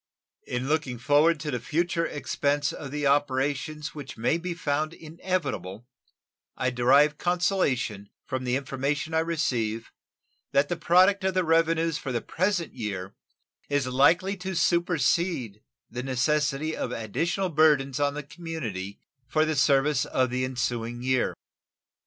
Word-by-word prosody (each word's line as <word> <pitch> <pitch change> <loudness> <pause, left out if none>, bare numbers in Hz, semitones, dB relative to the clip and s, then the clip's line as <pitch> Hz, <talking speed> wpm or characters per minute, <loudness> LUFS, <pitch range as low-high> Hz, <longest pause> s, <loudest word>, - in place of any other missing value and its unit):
In 125 +1 -2
looking 150 -5 0
forward 150 +6 +3
to 150 0 -3
the 125 - -2
future 165 +6 0
expense 145 0 -1
of 140 - -7
the 145 +1 -3
operations 145 +2 0
which 145 -3 -8
may 120 +9 +1
be 175 0 -4
found 155 -1 -1
inevitable 145 - -4 0.7
I 130 - 0
derive 140 +5 +4
consolation 175 - 0 0.2
from 130 0 -3
the 125 0 0
information 140 +3 -2
I 160 - +3
receive 120 -9 -1 0.6
that 140 +1 +3
the 175 - 0
product 185 +4 +4
of 190 0 0
the 185 - +3
revenues 165 -1 +2
for 135 - -5
the 120 - 0
present 180 - -1
year 100 -5 -5 0.6
is 145 -2 +1
likely 170 +10 +3
to 190 0 -5
supersede 170 - +1 0.3
the 120 - -5
necessity 145 +3 0
of - - -3
additional 165 - -1
burthens 145 -4 +3
on 145 0 +1
the 150 - -4
community 140 - -6 0.3
for 155 +5 +2
the 155 0 -1
service 140 0 +3
of 130 -2 0
the 130 +1 -1
ensuing 120 -2 -2
year. 130 -1 +1
145 Hz, 140 wpm, -27 LUFS, 130-165 Hz, 0.7 s, derive